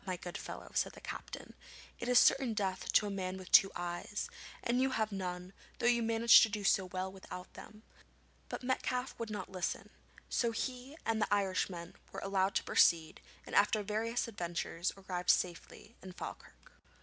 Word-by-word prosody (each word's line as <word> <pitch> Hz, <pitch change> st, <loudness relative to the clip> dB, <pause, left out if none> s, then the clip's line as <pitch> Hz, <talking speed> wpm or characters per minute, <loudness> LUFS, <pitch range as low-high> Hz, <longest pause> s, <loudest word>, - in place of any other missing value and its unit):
my 185 Hz, -2 st, -3 dB
good 175 Hz, 0 st, -8 dB
fellow,' -, -, -7 dB
said -, -, +1 dB
the -, -, -12 dB
captain; -, -, -7 dB, 0.5 s
'it 240 Hz, -, -3 dB
is 250 Hz, -, +5 dB
certain 255 Hz, -4 st, +5 dB
death 190 Hz, -3 st, -1 dB
to 210 Hz, -, +4 dB
a 205 Hz, -, -3 dB
man 190 Hz, -1 st, -3 dB
with 185 Hz, -1 st, -10 dB
two 195 Hz, -, +8 dB
eyes, 175 Hz, +4 st, -4 dB, 0.3 s
and 245 Hz, +1 st, +1 dB
you 265 Hz, -, +3 dB
have 220 Hz, -4 st, -1 dB
none, 180 Hz, -1 st, -5 dB, 0.2 s
though -, -, -3 dB
you 240 Hz, -1 st, +4 dB
manage 230 Hz, 0 st, +7 dB
to 220 Hz, -, +4 dB
do 210 Hz, -1 st, -4 dB
so 195 Hz, -1 st, +3 dB
well 185 Hz, +1 st, -4 dB
without 185 Hz, -1 st, -9 dB
them.' 215 Hz, 0 st, -12 dB, 0.7 s
But -, -, -5 dB
Metcalfe 250 Hz, 0 st, -1 dB
would 230 Hz, -1 st, -3 dB
not 205 Hz, -3 st, -5 dB
listen, 185 Hz, -1 st, -3 dB, 0.4 s
so 235 Hz, -, +1 dB
he 255 Hz, +5 st, -4 dB
and 225 Hz, -1 st, 0 dB
the -, -, 0 dB
Irishman 190 Hz, -3 st, 0 dB, 0.2 s
were -, -, -5 dB
allowed 195 Hz, 0 st, +1 dB
to -, -, +2 dB
proceed, 165 Hz, -2 st, +3 dB, 0.2 s
and -, -, -10 dB
after 210 Hz, +1 st, +4 dB
various 225 Hz, +4 st, -1 dB
adventures 175 Hz, -3 st, -3 dB
arrived 180 Hz, -2 st, -4 dB
safely 180 Hz, +5 st, 0 dB
in 185 Hz, -1 st, -9 dB
Falkirk. -, -, -9 dB
200 Hz, 180 wpm, -34 LUFS, 185-230 Hz, 0.7 s, two